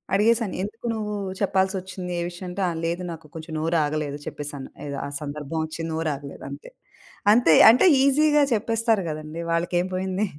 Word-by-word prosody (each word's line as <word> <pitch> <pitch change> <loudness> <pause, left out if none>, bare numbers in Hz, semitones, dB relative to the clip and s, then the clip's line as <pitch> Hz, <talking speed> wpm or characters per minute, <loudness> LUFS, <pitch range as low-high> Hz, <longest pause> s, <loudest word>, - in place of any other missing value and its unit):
అడిగేసాను. 220 0 +2
ఎందుకు 215 +4 -6
నువ్వు 210 -1 -3 0.3
చెప్పాల్సొచ్చింది 190 -2 -1
ఏ - - -1
విషయం 175 +1 -9
అంటే, 180 +3 -4
ఆహ్, 170 -2 -2
లేదు 170 +2 -1
నాకు 160 -1 -9
కొంచెం 160 0 -7
నోరాగలేదు 155 -3 0
చెప్పేసాను. 145 -2 -6 0.2
ఏదో 140 -1 -4
ఆ - - -4
సందర్భం 150 +1 -5
వచ్చి 160 +1 -7
నోరాగలేదు 150 -3 -4
అంతే. - - -9 0.6
అంతే 220 -7 +5 0.2
అంటే 245 +10 +6 0.2
ఈజీగా 295 +2 +4
చెప్పేస్తారు 225 -1 +1
గదండీ. 155 +1 -6
వాళ్ళకేం 175 +1 +1
పోయింది. 190 +2 -1
175 Hz, 150 wpm, -24 LUFS, 155-210 Hz, 0.6 s, అంటే